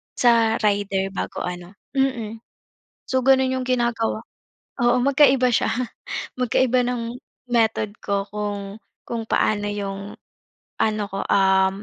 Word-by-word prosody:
sa 230 -2 +4
rider 200 -2 +1
bago - - -4
ano 180 0 -6 0.2
mm. 235 -5 -1 0.7
So, 260 -1 +1
gano'n 265 -1 +5
'yung 255 -1 -3
ginagawa 235 -3 0 0.6
oo, 240 +1 +4
magkaiba 270 -2 +5
siya, - - +2 0.7
magkaiba 250 0 +2
ng 240 -1 -3 0.3
method 220 -3 +1
ko 200 -1 -1
kung 205 -1 -4 0.3
kung 230 -1 -3
paano 205 -1 +1
'yung 200 0 -5 0.7
ano 215 -1 +1
ko, 195 - -3
um, 190 0 +3
220 Hz, 115 wpm, -23 LUFS, 200-250 Hz, 0.7 s, gano'n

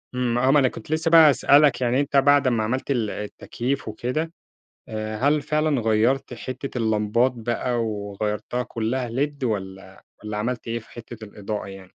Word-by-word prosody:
امم، 120 -1 0
آه، 130 +2 +3
ما 145 - +5
أنا 130 - +4
كنت 120 - -8
لسه 160 +1 0
بقى 160 -2 +9
هاسألك 140 0 +4
يعني 125 +2 +2
أنت 140 0 +1
بعد 145 0 +5
اما 115 -3 +1
عملت 130 +5 -2
ال 115 -6 0
التكييف 120 +6 -4
وكده 125 +9 -3 0.6
آآ، 110 0 -4
هل 145 +4 +2
فعلًا 150 -3 0
غيرت 115 +4 +1
حتة 130 +2 -6
اللمبات 110 +2 +2
بقى 120 +1 -1
وغيرتها 105 +3 -3
كلها 120 +1 -2
led 140 +3 -2
والّا 95 -4 -4 0.2
والّا 105 0 -4
عملت 120 +2 -3
إيه 115 +1 -2
في 110 - -19
حتة 120 -1 -10
الإضاءة 105 0 -5
يعني؟ 95 -1 -10
120 Hz, 170 wpm, -23 LUFS, 110-135 Hz, 0.6 s, بقى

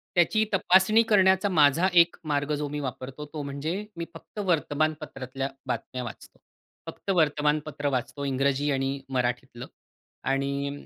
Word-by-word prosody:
त्याची 200 +5 +4
तपासणी 190 +3 +5
करण्याचा 190 -1 +4
माझा 160 +1 +4 0.2
एक 170 - -14 0.2
मार्ग 145 +1 0
जो 145 0 -3
मी 150 0 -4
वापरतो 130 +1 -6
तो 150 - -4
म्हणजे 155 +9 -3
मी 170 - -3
फक्त 165 +5 -11
वर्तमानपत्रातल्या 145 -5 -1 0.2
बातम्या 125 0 -3
वाचतो. 115 - -10 0.5
फक्त - - -10
वर्तमानपत्र 150 -2 +1
वाचतो 140 +3 -6
इंग्रजी 140 +1 +1
आणि 135 0 -1
मराठीतलं 125 -1 -2 0.6
आणि 140 +1 -2
145 Hz, 125 wpm, -27 LUFS, 135-165 Hz, 0.6 s, तपासणी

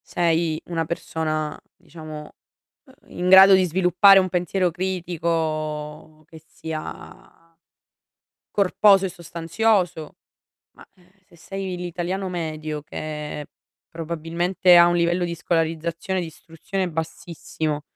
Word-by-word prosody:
Sei 165 -2 +1
una 165 -2 -2
persona, 155 -2 -3 0.2
diciamo, 155 -1 -10 0.5
uhm, 265 - -20 0.2
in 180 +1 0
grado 190 +1 +9
di 190 0 +5
sviluppare 185 +3 +5
un 190 -1 +4
pensiero 180 0 0
critico 160 -4 -3
che 160 +1 -15
sia 160 +1 -9 1.0
corposo 200 0 +4
e - - -2
sostanzioso, 170 0 -1 0.6
ma, - - -16
ehm, 180 -1 -25 0.2
se 170 - -21
sei 190 +1 -6
l'italiano 180 +2 -4
medio 155 -3 -4
che 150 -1 -6 0.4
probabilmente 170 +3 +1
ha 170 0 +8
un 175 - +2
livello 175 +1 +1
di 170 -1 -3
scolarizzazione 165 +2 -2
e - - -1
di 170 - -5
istruzione 170 +4 -5
bassissimo 160 -1 -4
170 Hz, 115 wpm, -23 LUFS, 155-180 Hz, 1.0 s, grado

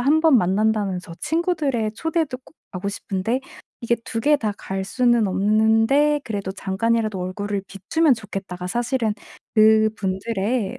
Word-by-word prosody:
1 295 +5 +3
번 310 -6 +6
만난다는 200 0 +1
저 170 - -11
친구들의 305 -10 0
초대도 315 +1 -2
꼭 - - -21 0.2
가고 185 +2 -4
싶은데 200 +4 -2 0.4
이게 235 0 +2
2 225 - -3
개 295 +4 +4
다 215 -5 -1
갈 190 0 -4
수는 240 +1 +2
없는데 225 +9 +3
그래도 200 -5 -4
잠깐이라도 210 +1 -1
얼굴을 200 +2 -3
비추면 270 - +2
좋겠다.'가 195 -4 -6
사실은 235 +2 0 0.4
그 220 0 +5
분들의 200 +4 -2
220 Hz, 300 characters per minute, -22 LUFS, 195-255 Hz, 0.4 s, 번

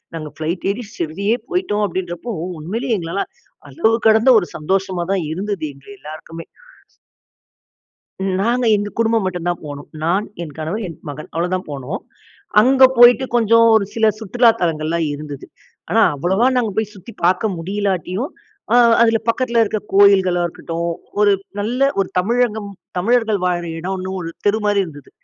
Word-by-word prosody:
நாங்க 155 -2 -6
ஃப்ளைட் 165 +3 -3
ஏறி 230 +2 -6
ஷீரடியே 200 +8 -1
போயிட்டோம் 360 - 0
அப்படின்றப்போ 180 +4 -4 0.3
உண்மையிலேயே 225 - -2
எங்களால 170 +3 -2 0.5
அளவு 165 +11 +1 0.2
கடந்த 220 +3 +5
ஒரு 175 - -5
சந்தோஷமா 185 +2 -1
தான் 190 -4 0
இருந்தது 190 0 -3
எங்க 140 +5 -20
எல்லாருக்குமே. 160 +2 -9 2.0
நாங்க 240 +4 +1
எங்க 205 0 -2
குடும்பம் 225 -2 +2
மட்டும் 180 -2 -3
தான் 175 - -2
போனோம். 145 -1 -8 0.2
நான், 190 +6 +1 0.2
என் 155 -4 -8
கணவன், 185 +8 -3
என் 165 - -10
மகன் 145 +2 -8
அவ்வளோதான் 180 +2 -2
போனோம். 140 +7 -5 0.6
அங்க 260 +3 +5
போயிட்டு 245 +2 +7
கொஞ்சம் 230 0 +5
ஒரு 205 - +2
சில 225 -1 +2
சுற்றுலா 230 +3 +3
தலங்கள்லாம் 165 -1 0
இருந்தது. 145 -1 -8 0.4
ஆனா - - +4
அவ்வளோவா 190 - +1
நாங்க 235 -4 +1
போய் 220 -1 -1
சுத்தி 205 +4 -12
பார்க்க 185 +4 +2
முடியலாட்டியும், 195 - -2 0.7
அதில 225 -1 +4
பக்கத்தில 235 0 +1
இருக்கிற 215 0 -1
கோயில்களா 190 -3 +5
இருக்கட்டும். 170 0 -4 0.3
ஒரு 205 -1 +5 0.3
நல்ல 250 +6 +1
ஒரு 195 - 0
தமிழகம் 220 0 0 0.3
தமிழர்கள் 225 +1 +2
வாழ்கிற 175 -1 -1
இடம்னு 185 +1 -4
ஒரு 165 - -5 0.2
தெரு 210 +2 +3
மாதிரி 205 -1 +3
இருந்தது. 145 -3 -13
195 Hz, 145 wpm, -19 LUFS, 170-225 Hz, 2.0 s, போயிட்டு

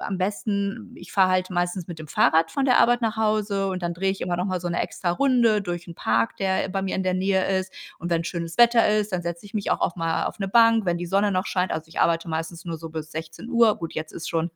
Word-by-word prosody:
am 195 - -3
besten, 200 +2 -2
ich - - -12
fahre 190 -2 +4
halt 185 0 +1
meistens 175 0 -1
mit 170 -3 -7
dem 155 -2 -9
Fahrrad 160 +4 +3
von 275 +7 -1
der 250 -2 +4
Arbeit 240 0 +3
nach 220 -1 0
Hause, 210 -2 +1
und 185 -1 -4
dann 170 0 -1
drehe 190 +3 0
ich 195 - -4
immer 175 -1 -1
noch 180 - -1
mal 185 -2 -2
so 175 - -2
'ne 170 - -1
Extrarunde 230 +3 +2
durch 175 -2 -5
'n 170 - -9
Park, 230 - 0
der 190 -1 0
bei 195 +1 -1
mir 190 - -2
in 190 - -1
der 185 0 0
Nähe 190 0 +1
ist. 185 0 -5 0.3
Und 175 - -5
wenn 165 0 +1
schönes 170 -1 -4
Wetter 235 -1 +5
ist, 210 -1 +1
dann 180 - 0
setze 170 +2 -5
ich 205 - -13
mich 210 -2 -2
auch - - +1
oft 175 - 0
mal 165 0 0
auf - - -4
'ne 195 -1 -2
Bank, 230 -1 +5
wenn 175 0 +1
die 175 - -4
Sonne 200 +3 +2
noch 185 0 0
scheint. 185 -1 0
Also, 160 0 -4
ich 160 - -4
arbeite 165 0 +2
meistens 165 +2 -4
nur 165 -2 -5
so 165 - -8
bis 155 -1 -7
16:00. 215 +9 +1
Gut, 165 -1 -6
jetzt 155 0 -5
ist 165 - -6
schon 165 +1 -1
185 Hz, 270 wpm, -24 LUFS, 170-205 Hz, 0.3 s, Wetter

